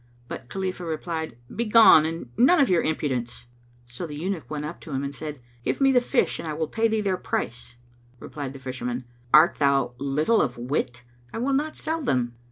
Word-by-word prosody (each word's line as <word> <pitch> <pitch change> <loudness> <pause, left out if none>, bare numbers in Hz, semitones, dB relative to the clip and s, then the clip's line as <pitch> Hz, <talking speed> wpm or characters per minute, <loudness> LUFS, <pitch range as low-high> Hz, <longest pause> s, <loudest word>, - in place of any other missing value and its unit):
But 125 0 -8
Khalifah 185 -2 -3
replied, 160 -4 -4 0.2
"Begone 220 -8 +6
and 165 -7 -6
none 265 - +5
of 275 - +4
your 180 -2 +4
impudence!" 130 -6 -2 0.4
[FN#226] - - -23
So 165 +8 -5
the 150 - -7
eunuch 160 -4 -4
went 150 -1 -4
up 160 +3 -7
to 155 - -10
him 135 0 -2
and 140 0 -4
said, 150 -1 -7 0.2
"Give - - -1
me 270 -1 +5
the 250 -2 +4
fish - - +1
and - - -5
I 155 - -2
will 160 +1 -2
pay 225 +7 +1
thee 220 -1 0
their 195 -3 0
price." 120 -7 -4 0.4
Replied 140 -3 -6
the - - -9
Fisherman, 125 -1 -4 0.3
"Art 155 +6 +6
thou 140 -4 +2
little 150 +11 +2
of 120 - -1
wit? 125 0 -3 0.3
I - - -6
will 260 +4 0
not 300 +3 0
sell 320 +1 -2
them." 125 - 0
155 Hz, 205 wpm, -25 LUFS, 130-200 Hz, 0.4 s, Begone